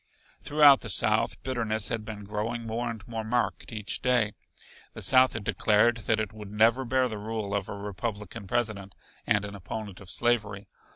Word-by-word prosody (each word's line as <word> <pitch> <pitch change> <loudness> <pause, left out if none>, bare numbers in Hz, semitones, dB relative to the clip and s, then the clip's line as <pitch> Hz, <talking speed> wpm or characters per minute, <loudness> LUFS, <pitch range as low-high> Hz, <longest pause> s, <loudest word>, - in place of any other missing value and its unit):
Throughout 145 -2 +6
the - - -7
South, - - +2
bitterness 115 -5 -1
had 115 -2 -2
been 105 -1 -7
growing 110 +3 -3
more 115 +2 -2
and 115 0 -7
more 115 -1 -4
marked 120 +3 -1
each 105 -1 -4
day. 120 -5 +2 0.6
The - - -5
South 130 -1 +5
had 115 - -5
declared 110 +3 +3
that 110 -1 +3
it 110 0 -3
would 105 -2 -9
never 115 +5 +3
bear 130 +1 +2
the 110 -3 -6
rule 105 -1 -4
of 100 -1 -2
a - - -4
Republican 105 0 -5
President 100 -4 -2 0.3
and 105 -1 +2
an 100 - -7
opponent 100 0 -7
of 100 - -12
slavery. 105 -4 0
110 Hz, 180 wpm, -28 LUFS, 105-120 Hz, 0.6 s, Throughout